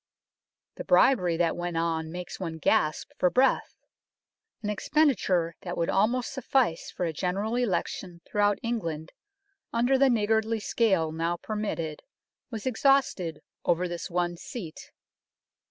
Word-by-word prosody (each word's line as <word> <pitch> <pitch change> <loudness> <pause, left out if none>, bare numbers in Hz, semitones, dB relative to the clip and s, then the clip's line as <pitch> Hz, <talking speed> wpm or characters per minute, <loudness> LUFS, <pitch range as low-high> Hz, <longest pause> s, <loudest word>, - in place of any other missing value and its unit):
The - - -5
bribery 180 - +4
that 170 -1 +1
went 175 -1 -3
on 165 -1 -1
makes 180 +1 -7
one 165 -4 -4
gasp 155 -1 +1
for 180 - +4
breath! 260 +7 +2 0.9
An 210 - -1
expenditure 205 - +2
that 175 -1 -5
would 170 - 0
almost 235 +6 +1
suffice 260 - 0
for 180 - -3
a 165 - -2
General 195 +7 -1
Election 185 -5 -2
throughout 205 -1 +2
England 170 -9 -3 0.6
under 245 +3 +2
the 275 0 +5
niggardly 220 -1 +1
scale 190 -8 +1
now 165 +2 -1
permitted 175 -7 -4 0.5
was 225 -4 -6
exhausted 255 - +2 0.2
over 180 +2 +1
this 175 -1 -5
one 175 0 -1
seat. 170 -5 -8
185 Hz, 130 wpm, -28 LUFS, 170-230 Hz, 0.9 s, the